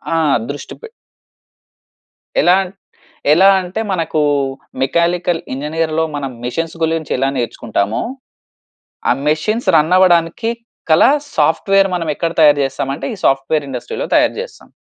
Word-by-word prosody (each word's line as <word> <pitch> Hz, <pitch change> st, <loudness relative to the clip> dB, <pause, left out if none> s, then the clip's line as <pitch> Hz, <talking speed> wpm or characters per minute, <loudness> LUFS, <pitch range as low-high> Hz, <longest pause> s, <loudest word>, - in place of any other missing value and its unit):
ఆ! -, -, +2 dB, 0.3 s
దృష్టి 145 Hz, -, -7 dB
పె 460 Hz, -, -9 dB, 1.5 s
ఎలా 180 Hz, +1 st, +5 dB, 0.8 s
ఎలా 190 Hz, +4 st, +5 dB
అంటే 180 Hz, +4 st, -5 dB
మనకు 160 Hz, -4 st, -1 dB, 0.6 s
మెకానికల్ 170 Hz, +4 st, +1 dB
ఇంజనీర్‌లో 155 Hz, +3 st, -1 dB
మనం 135 Hz, -2 st, -4 dB
మెషిన్స్ 165 Hz, +7 st, -3 dB
గురించి 160 Hz, -1 st, -1 dB
ఎలా 135 Hz, +1 st, +1 dB
నేర్చుకుంటామో? 110 Hz, -3 st, -2 dB, 1.1 s
ఆ -, -, +5 dB, 0.2 s
మెషిన్స్ 215 Hz, +10 st, 0 dB
రన్ 155 Hz, +4 st, +2 dB
అవ్వడానికి 175 Hz, +4 st, +3 dB, 0.4 s
గల 155 Hz, -, +6 dB, 0.3 s
సాఫ్ట్‌వేర్ 195 Hz, +6 st, +3 dB
మనం 165 Hz, -2 st, -3 dB
ఎక్కడ 165 Hz, -1 st, -2 dB
తయారు 145 Hz, -1 st, +6 dB
చేస్తాం 135 Hz, 0 st, -4 dB
అంటే -, -, -7 dB
ఈ -, -, -15 dB
సాఫ్ట్‌వే‌ర్ 135 Hz, +2 st, +1 dB
ఇండస్ట్రి‌లో 125 Hz, -2 st, -5 dB
తయారు -, -, +3 dB
చేస్తాం. -, -, -11 dB
160 Hz, 120 wpm, -16 LUFS, 145-175 Hz, 1.5 s, గల